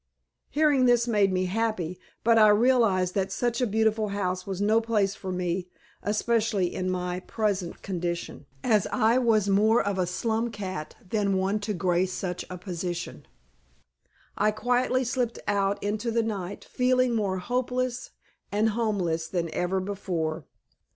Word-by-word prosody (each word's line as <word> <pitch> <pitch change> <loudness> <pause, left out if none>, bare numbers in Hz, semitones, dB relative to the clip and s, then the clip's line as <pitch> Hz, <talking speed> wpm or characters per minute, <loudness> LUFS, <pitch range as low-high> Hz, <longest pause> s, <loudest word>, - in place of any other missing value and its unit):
Hearing 290 -4 +3
this 240 -1 +4
made 205 -4 +3
me 185 0 +1
happy, 185 -3 -1 0.2
but 230 0 +5
I 215 - +8
realized 210 -5 +3
that 195 -1 -1
such 240 +3 -1
a 250 - +2
beautiful 220 0 +1
house 185 -2 -2
was 190 -1 -3
no 215 +3 +3
place 210 -4 +1
for 190 -1 -6
me, 180 0 -2 0.3
especially 210 -3 0
in 185 0 -2
my 180 0 -2
present 195 -3 -2
condition, 170 -5 -4 0.2
as 215 -5 +3
I 230 +3 +3
was 220 -5 +3
more 215 +4 +4
of 200 -1 -1
a 180 - +1
slum 225 +5 -1
cat 190 -7 -6
than 200 -1 +1
one 195 +3 0
to 210 +1 -3
grace 180 0 +1
such 180 -2 -3
a 180 - -6
position. 175 -1 -5 1.1
I 210 - +3
quietly 250 +4 +1
slipped 245 -1 -1
out 200 0 +1
into 210 +3 -1
the 230 0 +1
night, 200 -4 -4
feeling 255 -1 +2
more 200 -4 0
hopeless 250 +4 -2 0.4
and 215 +2 +2
homeless 195 -8 -1
than 170 -3 -2
ever 180 +2 0
before. 175 -6 -3
205 Hz, 150 wpm, -27 LUFS, 185-230 Hz, 1.1 s, I